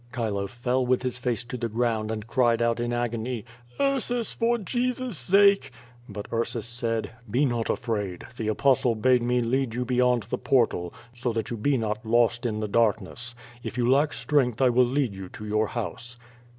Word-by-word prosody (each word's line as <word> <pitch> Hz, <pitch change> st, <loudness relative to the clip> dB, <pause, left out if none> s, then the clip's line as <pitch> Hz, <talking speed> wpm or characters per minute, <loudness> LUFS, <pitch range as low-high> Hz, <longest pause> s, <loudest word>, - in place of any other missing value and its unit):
Chilo 105 Hz, -5 st, -1 dB
fell 125 Hz, +3 st, -1 dB
with 125 Hz, 0 st, +1 dB
his 125 Hz, -1 st, -2 dB
face 120 Hz, -1 st, -1 dB
to 120 Hz, +2 st, -6 dB
the 115 Hz, -1 st, -2 dB
ground 110 Hz, -1 st, 0 dB
and 110 Hz, -1 st, -4 dB
cried 120 Hz, -1 st, +2 dB
out 115 Hz, 0 st, +1 dB
in 120 Hz, 0 st, -1 dB
agony: 120 Hz, -1 st, -2 dB, 0.3 s
"Ursus, 255 Hz, -4 st, 0 dB
for 235 Hz, +1 st, +1 dB
Jesus's 245 Hz, +1 st, -2 dB
sake!" 195 Hz, +3 st, +4 dB, 0.4 s
But 105 Hz, 0 st, -6 dB
Ursus 115 Hz, -1 st, -1 dB
said, 115 Hz, -1 st, -2 dB, 0.2 s
"Be 125 Hz, +7 st, +2 dB
not 120 Hz, -3 st, -1 dB
afraid. 105 Hz, -6 st, -2 dB
The 110 Hz, -2 st, -3 dB
Apostle 120 Hz, +2 st, +3 dB
bade 125 Hz, +3 st, +3 dB
me 125 Hz, +1 st, +1 dB
lead 120 Hz, 0 st, 0 dB
you 125 Hz, +1 st, -1 dB
beyond 125 Hz, -1 st, +2 dB
the 110 Hz, -, -4 dB
portal, 115 Hz, -10 st, +1 dB, 0.2 s
so 120 Hz, 0 st, -2 dB
that 115 Hz, 0 st, -3 dB
you -, -, -1 dB
be 135 Hz, +6 st, +1 dB
not 110 Hz, -2 st, -2 dB
lost 120 Hz, +2 st, +2 dB
in 110 Hz, -1 st, -2 dB
the 105 Hz, -, -1 dB
darkness. 115 Hz, +2 st, 0 dB, 0.3 s
If 120 Hz, -, -6 dB
you 120 Hz, -1 st, +2 dB
lack 140 Hz, +4 st, +4 dB
strength 125 Hz, -1 st, +1 dB
I 130 Hz, -2 st, +5 dB
will 125 Hz, +1 st, +4 dB
lead 130 Hz, -3 st, 0 dB
you 95 Hz, -1 st, -8 dB
to 105 Hz, -, -9 dB
your 105 Hz, +1 st, +1 dB
house." 120 Hz, +1 st, -5 dB
120 Hz, 190 wpm, -26 LUFS, 110-130 Hz, 0.4 s, I